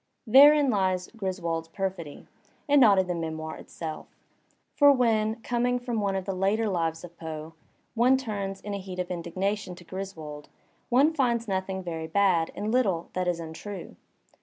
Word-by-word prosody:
Therein 280 +3 +7
lies 185 -3 0
Griswold's 175 -5 -3
perfidy, 175 -4 -5 0.4
and 290 -1 +5
not 210 -5 +7
in 190 - +3
the 180 - -2
memoir 160 -1 -4
itself. 160 -2 -7 0.7
For 285 -1 +6
when, 225 -4 +2
coming 245 +1 +1
from 245 -3 -3
one 200 -1 0
of 190 -1 -3
the 195 - -2
later 200 +4 +1
lives 165 -4 -1
of 170 -1 -11
Poe, 160 0 -7 0.4
one 250 +3 +4
turns 200 -6 -4
in 205 - -5
a 200 - -3
heat 185 -1 -8
of 180 0 -3
indignation 185 +3 -3
to 175 - -14
Griswold, 165 -6 -7 0.4
one 275 +6 +4
finds 240 -6 +1
nothing 190 -1 -2
very 165 -2 -4
bad 170 -2 +2
and 210 +2 -3
little 195 -9 +1
that 185 -1 -1
is 175 -1 0
untrue. 170 +4 -8
190 Hz, 165 wpm, -27 LUFS, 170-225 Hz, 0.7 s, Therein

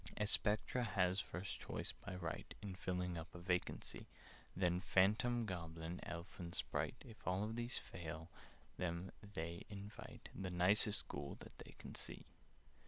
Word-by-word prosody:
"A 105 - +3
Spectre 105 +4 +3
has 95 -4 +4
first 95 0 -3
choice, - - -1
by - - -6
right, 85 -2 -3
In 100 -2 -4
filling 90 -2 0
up 80 - -8
a - - -3
vacancy; 90 0 0 0.5
Then 90 -1 +4
Phantom, 110 +6 +5
Goblin, 85 -2 -3
Elf, 85 +1 -5
and 85 -1 -4
Sprite— - - +1
If 110 -6 -11
all 95 +3 +3
these 120 +2 +1
fail 80 0 -5 0.5
them, 90 +1 0 0.2
they 85 0 -1
invite 105 +4 -7
The 95 -2 -2
nicest 95 +4 +5
Ghoul 70 - -3
that - - -9
they - - -9
can - - -7
see. - - -4
90 Hz, 150 wpm, -42 LUFS, 85-105 Hz, 0.5 s, Phantom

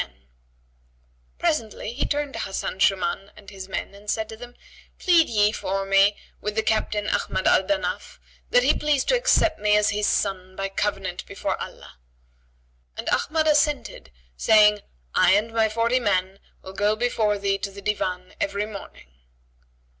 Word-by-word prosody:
[FN#83] - - -20 1.3
Presently, 235 -9 -2
he 265 - -2
turned 290 -1 -2
to - - -5
Hasan 190 0 -4
Shuman 195 0 +1
and 200 -1 -13
his 190 -1 -9
men 190 - -4
and 205 +1 -12
said 220 0 -1
to 220 - -7
them, 245 +2 -11 0.4
"Plead 345 -3 +4
ye 210 -2 +3
for 195 -2 -3
me 195 +1 +4 0.2
with 210 +1 -3
the 220 - +1
Captain 215 -1 0
Ahmad 190 - -1
al - - +5
Danaf 295 +9 -3 0.3
that - - +4
he - - +4
please 295 -3 0
to - - +3
accept 480 - +2
me 210 0 +3
as 210 0 +2
his 210 0 0
son 185 -2 -1
by 195 0 -3
covenant 195 -2 -2
before - - -3
Allah." 65 - -10 1.0
And - - -4
Ahmad 315 +1 +1
assented, 295 - +1 0.3
saying, 210 - +5 0.3
"I 185 0 +5
and 215 +3 +1
my 220 -1 +2
forty 230 +3 +1
men 190 -3 0 0.2
will 190 - -9
go 205 +2 +1
before 220 -3 0
thee 200 0 -1
to 200 - -3
the 200 0 -12
Divan 185 -3 -2
every 200 +1 -1
morning." 200 - -11
210 Hz, 165 wpm, -24 LUFS, 195-230 Hz, 1.3 s, al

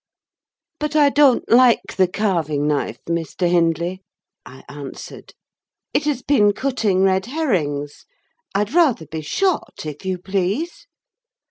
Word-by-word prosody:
"But 300 0 -3
I 295 -2 +5
don't 280 -3 +3
like 245 0 +4
the 190 -1 +3
carving 170 -7 -1
knife, 150 -1 -1
Mr. 170 +1 -1
Hindley," 170 +1 0 0.4
I 130 +1 -14
answered; 145 -1 -10 0.6
"it 295 - +1
has 285 -4 -1
been 210 -8 +3
cutting 215 -7 0
red 190 +1 +2
herrings. 160 - -2 0.5
I'd 205 +5 0
rather 295 - +3
be 160 0 -6
shot, 355 - -2
if 150 -1 -7
you 190 -1 -2
please." 195 - -3
190 Hz, 125 wpm, -20 LUFS, 165-260 Hz, 0.6 s, I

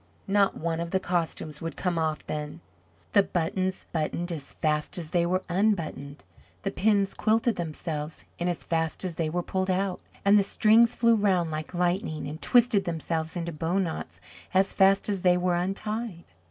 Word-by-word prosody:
Not 200 0 +2
one 165 0 -2
of 170 0 -3
the 190 - +1
costumes 165 -4 -2
would 165 0 -4
come 180 -3 -1
off 155 -1 -1
then. 150 +1 -5 0.5
The 200 - +7
buttons 185 +1 -2
buttoned 170 +2 -2
as 150 -4 -6
fast 150 +1 0
as 165 -3 -5
they 170 -1 +2
were 185 +1 0
unbuttoned; 170 -7 -1 0.4
the 195 - -1
pins 200 -1 +2
quilted 225 +1 +2
themselves 155 -2 -5
in 175 - -1
as 175 -2 -2
fast 165 +2 -1
as 180 - -2
they 160 -1 -1
were 175 +2 -2
pulled 190 +1 -2
out; 185 0 0 0.3
and 205 +1 +6
the - - +3
strings 225 +3 +4
flew 230 0 +4
round 190 -6 +2
like 155 +3 -5
lightning 175 -3 -1
and 155 +3 -7
twisted 235 -5 +4
themselves 165 0 -2
into 170 0 -3
bow 165 +4 -1
knots 180 -5 -3 0.4
as 190 +1 +3
fast 195 0 +4
as 200 -3 -1
they 180 -1 +4
were 180 0 +1
untied. 195 +1 -3
175 Hz, 180 wpm, -27 LUFS, 160-195 Hz, 0.5 s, The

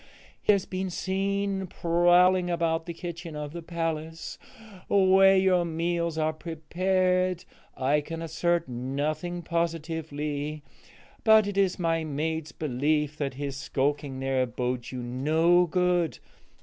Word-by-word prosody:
He - - +4
has 200 -2 +2
been 185 0 -3
seen 195 +1 -1
prowling 175 +2 +3
about 165 -1 0
the 170 - -4
kitchen 170 -2 -7
of 150 0 -5
the 170 - -6
palace 165 -1 -4 0.5
where 195 0 +6
your 185 -2 +3
meals 170 0 -1
are 155 0 +1
prepared. 180 +3 0 0.3
I 140 +3 +2
can 165 +2 -6
assert 170 +1 0
nothing 150 +8 -3
positively, 155 -3 -3 0.6
but 220 -1 +6
it 205 -1 -3
is 195 -2 +2
my 165 -2 0
maid's 160 +1 -3
belief 150 +1 0
that 140 -4 -3
his 140 0 -4
skulking 140 0 -1
there 135 -1 0
bodes 125 0 -3
you 125 -2 -5
no 160 +8 +3
good. 180 -1 +1
165 Hz, 125 wpm, -27 LUFS, 150-180 Hz, 0.6 s, where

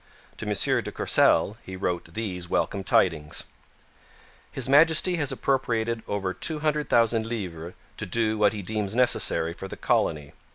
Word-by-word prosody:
To 110 - -6
M. 105 - 0 0.3
de - - -7
Courcelle 105 - +2
he 95 - -9
wrote 90 -3 -4
these 90 -6 -4
welcome 100 -2 -1
tidings: 80 -6 +1 1.1
His - - -4
Majesty 160 +5 +4
has 145 -4 +1
appropriated 115 -4 -1
over 95 -2 -2
200,000 150 - +1
livres 90 -7 -6 0.2
to 105 - -4
do 110 +3 0
what 105 -1 +4
he 105 -2 -6
deems 105 +1 -3
necessary 120 -9 +2
for 95 - -8
the - - -9
colony. 75 -1 -1
105 Hz, 140 wpm, -25 LUFS, 90-120 Hz, 1.1 s, Majesty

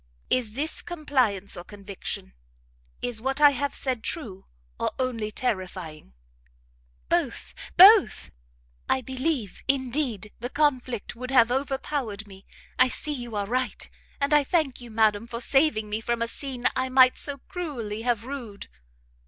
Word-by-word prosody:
"Is 235 -4 +1
this 295 +6 -2
compliance 255 - -1
or 175 - -7
conviction? 195 - -7 0.7
Is 245 -3 -2
what 270 +3 -1
I 290 -1 +8
have 285 +1 -2
said 255 -4 -1
true, 210 - -5 0.3
or - - +1
only 240 -5 -2
terrifying?" 185 - -4 0.9
"Both, - - -1 0.2
both! - - +7 0.6
I 265 - +2
believe, 260 - -2
indeed, 255 -6 0
the 245 +2 -4
conflict 255 -7 0
would 250 +2 -6
have 245 -3 +5
overpowered 265 -5 -2
me, 195 -1 -15 0.3
I 255 - +7
see 300 +4 -3
you 240 -5 -6
are 205 -1 -1
right, 250 +4 -2 0.3
and 280 +1 +1
I 295 -1 +6
thank 280 -4 0
you, 240 - -10
madam, 220 0 +2
for 235 0 -5
saving 250 -4 +2
me 210 +1 -3
from 235 0 -1
a - - -2
scene 255 0 -6
I 260 0 0
might 255 0 +5
so 285 -1 -2
cruelly 255 - -5
have 235 -2 0
rued." 245 -7 -7
245 Hz, 145 wpm, -26 LUFS, 215-270 Hz, 0.9 s, I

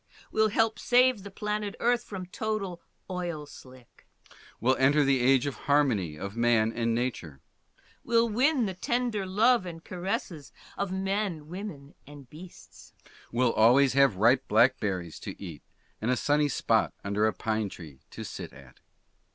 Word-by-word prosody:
Will 220 0 +3
help 225 +1 +1
save 250 -2 +3
the 200 - -9
planet 210 +1 -3
Earth 240 0 +2
from 190 -3 -7
total 195 -2 -4 0.3
oil 175 -5 -4
slick. 130 -4 -16 0.5
Will 130 +3 +2
enter 140 +3 +4
the 135 -1 +2
age 130 +1 +4
of 140 - -2 0.2
harmony 115 - +2
of 100 +5 -6
man 115 -1 +2
and 115 -1 0
nature. 110 - -3 0.6
Will 230 0 +3
win 255 +3 +2
the 190 - -3
tender 230 0 -2
love 215 +1 +3
and 165 -1 -8
caresses 175 -4 -4 0.2
of 200 -2 -3
men, 190 -4 -2
women, 175 -7 -8
and 145 -2 -12
beasts. 170 +7 -14 0.4
Will 120 0 +2
always 125 +5 +5
have 135 -5 +4
ripe 120 +7 +3
blackberries 105 -7 +1
to - - -8
eat 85 -7 -8 0.4
and 110 - -1
a 125 - +2
sunny 145 0 +2
spot - - +1
under 100 +2 +1
a - - +2
pine 110 +2 -2
tree 75 -8 -12
to - - -8
sit - - -7
at. 65 -2 -16
145 Hz, 155 wpm, -28 LUFS, -, 0.6 s, always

